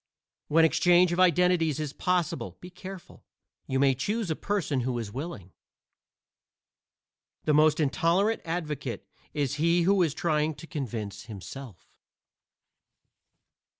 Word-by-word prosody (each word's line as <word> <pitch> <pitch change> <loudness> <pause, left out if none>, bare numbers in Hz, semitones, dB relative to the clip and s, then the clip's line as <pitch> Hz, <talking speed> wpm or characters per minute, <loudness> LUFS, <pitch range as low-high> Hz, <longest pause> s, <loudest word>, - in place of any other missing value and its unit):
When 160 +2 +5
exchange 175 +2 +4
of 175 - -2
identities 180 -4 +3
is 150 -2 -3
possible, 175 -2 -1
be 180 - -11
careful; 185 0 -10 0.4
you 135 - -1
may 135 0 +4
choose 205 - -2
a - - 0
person 170 -10 -1
who 125 0 -1
is 110 -4 -4
willing. 130 - -6 1.9
The 150 - +2
most 155 +1 +4
intolerant 175 +8 +2
advocate 150 - -4 0.3
is 140 -2 -1
he 170 +1 +3
who 195 +2 +3
is 160 -4 +1
trying 155 -1 0
to 165 - -11
convince 115 - -5
himself. 110 0 -10
155 Hz, 120 wpm, -28 LUFS, 135-175 Hz, 1.9 s, When